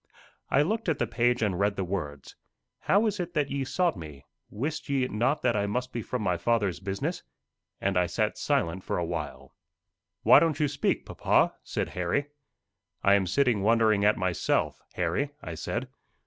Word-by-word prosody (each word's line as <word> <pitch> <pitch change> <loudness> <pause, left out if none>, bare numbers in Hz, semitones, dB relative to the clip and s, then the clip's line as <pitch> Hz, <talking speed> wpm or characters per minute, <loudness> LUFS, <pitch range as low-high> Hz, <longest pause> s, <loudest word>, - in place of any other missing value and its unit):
I 140 - +4
looked 220 +4 -1
at 155 - +1
the - - +1
page 120 0 +1
and 95 -4 0
read 100 0 +2
the 95 - -2
words, 75 -7 -5 0.4
"How 205 +4 +3
is 210 -2 -1
it 175 -1 -4
that 145 -2 0
ye 140 -1 -1
sought 145 +4 +1
me? 75 -6 -10 0.2
wist 145 +9 -4
ye 135 -2 +1
not 125 +6 0
that 120 -2 +2
I 100 -1 0
must 125 +4 -2
be 120 - -2
about 125 +4 -3
my 90 -4 +1
Father's 105 -1 0
business?" 95 +1 -3 0.6
And 100 0 0
I 90 -1 +3
sat 105 +4 -1
silent 85 +3 0
for - - -2
a 85 - -1
while. 70 -6 -5 0.7
"Why - - +8
don't 160 -4 +1
you 150 - +3
speak, 145 0 -1
papa?" - - +2
said - - -3
Harry. 90 +12 -1 0.7
"I 100 - +5
am 100 -2 +3
sitting 125 -3 +2
wondering 110 -1 +3
at 105 +1 +4
myself, 90 -3 0
Harry," 90 - 0
I 85 - -5
said. 120 +10 -3
105 Hz, 185 wpm, -28 LUFS, 90-135 Hz, 0.7 s, Why